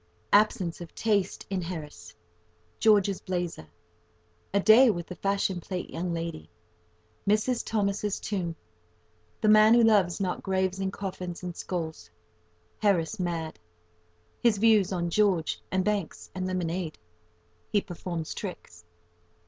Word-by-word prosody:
—Absence 200 Hz, -5 st, +3 dB
of 170 Hz, -, -10 dB
taste 205 Hz, -4 st, 0 dB
in 190 Hz, -2 st, 0 dB
Harris.—George's 130 Hz, -, -2 dB
blazer.—A 85 Hz, -, -6 dB
day 230 Hz, +5 st, +7 dB
with 175 Hz, -5 st, -1 dB
the 180 Hz, -, -8 dB
fashion 195 Hz, -2 st, -1 dB
plate 180 Hz, +1 st, -5 dB
young 175 Hz, +2 st, -3 dB
lady.—Mrs. 90 Hz, -, -4 dB
Thomas's 205 Hz, -1 st, -1 dB
tomb.—The 90 Hz, -, -7 dB
man 215 Hz, +1 st, +7 dB
who 240 Hz, -, +5 dB
loves 200 Hz, -6 st, +4 dB
not 185 Hz, -2 st, -2 dB
graves 190 Hz, -1 st, 0 dB
and 190 Hz, 0 st, -1 dB
coffins 185 Hz, -3 st, -6 dB
and 175 Hz, -1 st, -5 dB
skulls.—Harris 90 Hz, -, -4 dB
mad.—His 90 Hz, -, -4 dB
views 210 Hz, -3 st, +4 dB
on 175 Hz, -2 st, -1 dB
George 190 Hz, -5 st, +1 dB
and 185 Hz, 0 st, 0 dB
Banks 205 Hz, -6 st, -2 dB
and 185 Hz, 0 st, -3 dB
lemonade.—He 90 Hz, -, -4 dB
performs 170 Hz, -3 st, -5 dB
tricks. 90 Hz, -, -8 dB
175 Hz, 105 wpm, -28 LUFS, -, -, day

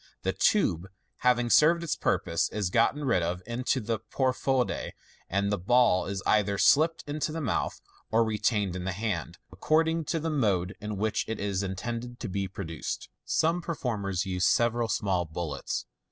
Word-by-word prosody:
The -, -, 0 dB
tube, 95 Hz, -, +2 dB, 0.3 s
having 120 Hz, -1 st, +2 dB
served 170 Hz, +3 st, +5 dB
its 170 Hz, -, -1 dB
purpose, 85 Hz, 0 st, 0 dB
is 100 Hz, -4 st, -2 dB
got 115 Hz, +6 st, +3 dB
rid 140 Hz, -11 st, +1 dB
of 90 Hz, +2 st, -2 dB
into 125 Hz, +2 st, -1 dB
the 115 Hz, -1 st, -2 dB
profonde, 130 Hz, 0 st, -1 dB, 0.4 s
and 100 Hz, +2 st, 0 dB
the 105 Hz, -, 0 dB
ball 95 Hz, -3 st, +3 dB
is 95 Hz, -1 st, -4 dB
either 100 Hz, -2 st, +2 dB
slipped 160 Hz, +9 st, +4 dB
into 150 Hz, +1 st, -2 dB
the 165 Hz, -, -3 dB
mouth 130 Hz, -10 st, -1 dB, 0.3 s
or 115 Hz, +1 st, +4 dB
retained 105 Hz, -3 st, 0 dB
in 90 Hz, -, -4 dB
the 95 Hz, 0 st, -2 dB
hand, 100 Hz, -, -3 dB
according 160 Hz, +1 st, +1 dB
to 165 Hz, -, -1 dB
the 160 Hz, +1 st, -2 dB
mode 100 Hz, -9 st, +1 dB
in 105 Hz, -1 st, -4 dB
which 110 Hz, +2 st, 0 dB
it 110 Hz, -, -3 dB
is 100 Hz, -2 st, -1 dB
intended 115 Hz, +5 st, -4 dB
to -, -, -4 dB
be 100 Hz, 0 st, -2 dB
produced. 85 Hz, -5 st, -5 dB, 0.2 s
Some 170 Hz, +2 st, +1 dB
performers 105 Hz, -, -2 dB
use 90 Hz, -1 st, +1 dB
several 120 Hz, 0 st, +2 dB
small 95 Hz, -5 st, 0 dB
bullets. 80 Hz, -5 st, -4 dB
110 Hz, 170 wpm, -28 LUFS, 95-130 Hz, 0.4 s, served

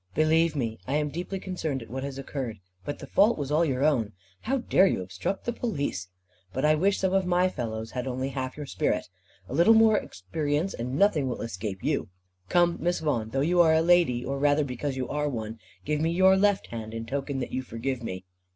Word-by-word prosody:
"Believe 160 Hz, +1 st, +3 dB
me, 115 Hz, -5 st, -2 dB
I 135 Hz, -, 0 dB
am 150 Hz, 0 st, +1 dB
deeply 175 Hz, +5 st, -4 dB
concerned 160 Hz, -9 st, -3 dB
at 115 Hz, -, -15 dB
what 130 Hz, +1 st, -3 dB
has 140 Hz, -1 st, -5 dB
occurred. 130 Hz, -4 st, -4 dB, 0.3 s
But 145 Hz, -, -4 dB
the -, -, -9 dB
fault 215 Hz, +4 st, +3 dB
was 145 Hz, -2 st, -3 dB
all 155 Hz, +3 st, +4 dB
your 135 Hz, -4 st, 0 dB
own. 120 Hz, -8 st, +2 dB, 0.3 s
How 270 Hz, +4 st, -1 dB
dare 195 Hz, -6 st, +4 dB
you 95 Hz, -, 0 dB
obstruct 95 Hz, -, -4 dB
the 240 Hz, -, -1 dB
Police? 140 Hz, -, -3 dB, 0.5 s
But 130 Hz, +3 st, 0 dB
I 155 Hz, -, +5 dB
wish 190 Hz, +6 st, +2 dB
some 190 Hz, -1 st, 0 dB
of 190 Hz, -1 st, +2 dB
my 180 Hz, +1 st, +3 dB
fellows 115 Hz, -6 st, -4 dB
had 125 Hz, 0 st, -4 dB
only 130 Hz, +1 st, -2 dB
half 130 Hz, -1 st, -4 dB
your 150 Hz, -, -5 dB
spirit. -, -, -1 dB, 0.4 s
A -, -, -7 dB
little 170 Hz, +10 st, +6 dB
more 220 Hz, -1 st, +6 dB
experience, 145 Hz, -, -2 dB
and 125 Hz, +3 st, -4 dB
nothing 160 Hz, -8 st, +3 dB
will 125 Hz, -, -4 dB
escape 100 Hz, -3 st, -5 dB
you. 145 Hz, -8 st, 0 dB, 0.4 s
Come, 175 Hz, -1 st, +3 dB
Miss 175 Hz, 0 st, +1 dB
Vaughan, 120 Hz, -8 st, -1 dB
though 135 Hz, +4 st, -1 dB
you 175 Hz, +4 st, +4 dB
are 160 Hz, -2 st, +5 dB
a 160 Hz, -, +4 dB
lady, 170 Hz, -9 st, +3 dB
or 135 Hz, +2 st, -2 dB
rather 145 Hz, +1 st, +3 dB
because 135 Hz, +1 st, -3 dB
you 130 Hz, -, -2 dB
are 150 Hz, 0 st, -1 dB
one, 110 Hz, -3 st, -5 dB, 0.3 s
give 150 Hz, 0 st, 0 dB
me 160 Hz, -, +2 dB
your 190 Hz, +3 st, +5 dB
left 200 Hz, 0 st, +2 dB
hand, 110 Hz, -1 st, -6 dB
in 115 Hz, 0 st, -4 dB
token 140 Hz, +3 st, -3 dB
that 130 Hz, -, -3 dB
you 130 Hz, -, -1 dB
forgive 130 Hz, +1 st, -4 dB
me." 95 Hz, -5 st, -6 dB
145 Hz, 225 wpm, -27 LUFS, 125-170 Hz, 0.5 s, little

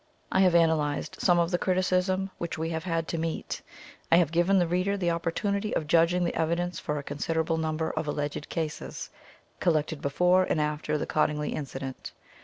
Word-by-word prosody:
I -, -, +2 dB
have 185 Hz, -2 st, +5 dB
analysed 160 Hz, -3 st, +1 dB
some 175 Hz, -2 st, +4 dB
of 170 Hz, +1 st, +2 dB
the 175 Hz, -, +1 dB
criti 185 Hz, -1 st, +1 dB, 0.2 s
cism 190 Hz, +1 st, -2 dB
which 170 Hz, -1 st, -3 dB
we 160 Hz, +1 st, -2 dB
have 160 Hz, +1 st, -3 dB
had 165 Hz, -2 st, -1 dB
to 165 Hz, -, -2 dB
meet. 165 Hz, 0 st, -3 dB, 0.5 s
I -, -, +8 dB
have 170 Hz, -3 st, +4 dB
given 175 Hz, +4 st, +3 dB
the 180 Hz, -, +4 dB
reader 185 Hz, +4 st, 0 dB
the 175 Hz, -3 st, +1 dB
opportunity 200 Hz, +5 st, -1 dB
of 155 Hz, -, 0 dB
judging 170 Hz, +3 st, +3 dB
the 170 Hz, -, 0 dB
evidence 170 Hz, +1 st, -1 dB
for 150 Hz, -, -3 dB
a 145 Hz, -, -4 dB
considerable 160 Hz, +3 st, -1 dB
nimiber 160 Hz, 0 st, -1 dB
of 155 Hz, 0 st, -2 dB
alleged 145 Hz, 0 st, -3 dB
cases, 160 Hz, -2 st, -4 dB, 0.5 s
collected 155 Hz, -2 st, +1 dB
before 180 Hz, +6 st, +3 dB
and 155 Hz, -, 0 dB
after 150 Hz, 0 st, -1 dB
the -, -, -2 dB
Cottingley 150 Hz, -1 st, 0 dB
incident. 135 Hz, -2 st, -6 dB
165 Hz, 190 wpm, -28 LUFS, 155-175 Hz, 0.5 s, I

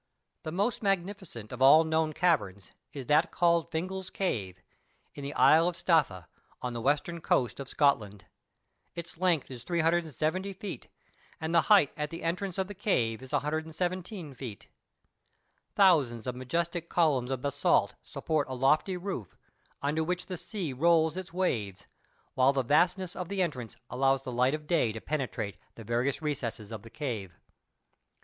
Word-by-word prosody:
The 155 Hz, -, -5 dB
most 200 Hz, +8 st, 0 dB
magnificent 190 Hz, -, -2 dB
of 125 Hz, -, -7 dB
all 145 Hz, +4 st, +8 dB
known 160 Hz, 0 st, +1 dB
caverns, 105 Hz, -, 0 dB, 0.2 s
is 135 Hz, -3 st, -7 dB
that 150 Hz, +5 st, +3 dB
called 170 Hz, -1 st, +2 dB
Fingal's 185 Hz, +3 st, -4 dB
Cave, 100 Hz, -, -2 dB, 0.5 s
in 145 Hz, -, -8 dB
the 140 Hz, +1 st, -5 dB
Isle 165 Hz, +2 st, +6 dB
of 175 Hz, -, -1 dB
Staffa, 155 Hz, -, +1 dB, 0.3 s
on 125 Hz, -1 st, -4 dB
the 120 Hz, -, -4 dB
western 150 Hz, +6 st, 0 dB
coast 125 Hz, -4 st, +1 dB
of 135 Hz, -1 st, -6 dB
Scotland. 105 Hz, -9 st, +1 dB, 0.7 s
Its 170 Hz, -1 st, -7 dB
length 175 Hz, -7 st, +1 dB
is 125 Hz, -2 st, -8 dB
370 170 Hz, +2 st, 0 dB
feet; 190 Hz, -, -7 dB, 0.5 s
and 160 Hz, +1 st, -3 dB
the 170 Hz, -, +6 dB
height 200 Hz, -9 st, +6 dB
at 150 Hz, 0 st, -3 dB
the 165 Hz, +1 st, -7 dB
entrance 180 Hz, +2 st, -2 dB
of 190 Hz, -, +1 dB
the 205 Hz, -, -8 dB
cave 125 Hz, -, 0 dB
is 130 Hz, -, -11 dB
117 160 Hz, +2 st, -2 dB
feet. 125 Hz, -5 st, -9 dB, 1.1 s
Thousands 145 Hz, -, +4 dB
of 125 Hz, -1 st, -3 dB
majestic 170 Hz, +6 st, -2 dB
columns 145 Hz, -8 st, +2 dB
of 130 Hz, -2 st, -3 dB
basalts 140 Hz, -1 st, +2 dB
support 155 Hz, -4 st, -2 dB
a 130 Hz, -, -3 dB
lofty 150 Hz, +8 st, +2 dB
roof, 180 Hz, -, -6 dB, 0.5 s
under 150 Hz, +3 st, +1 dB
which 180 Hz, +2 st, -2 dB
the 185 Hz, -, -5 dB
sea 180 Hz, -, -5 dB
rolls 160 Hz, +3 st, +3 dB
its 185 Hz, -1 st, -6 dB
waves, 115 Hz, -, -2 dB, 0.5 s
while 130 Hz, +2 st, +4 dB
the 135 Hz, -1 st, +1 dB
vastness 175 Hz, +7 st, +2 dB
of 180 Hz, -1 st, -5 dB
the 195 Hz, -2 st, +1 dB
entrance 125 Hz, -10 st, -4 dB, 0.2 s
allows 135 Hz, +1 st, +2 dB
the 130 Hz, -, -5 dB
light 125 Hz, +4 st, +2 dB
of 155 Hz, 0 st, -8 dB
day 150 Hz, -8 st, +2 dB
to 110 Hz, -, -6 dB
penetrate 120 Hz, -8 st, -3 dB, 0.2 s
the 115 Hz, -, -10 dB
various 120 Hz, +7 st, -1 dB
recesses 120 Hz, -7 st, -3 dB
of 110 Hz, -3 st, -6 dB
the 115 Hz, -, -13 dB
cave. 110 Hz, -, -5 dB
155 Hz, 160 wpm, -29 LUFS, 125-175 Hz, 1.1 s, all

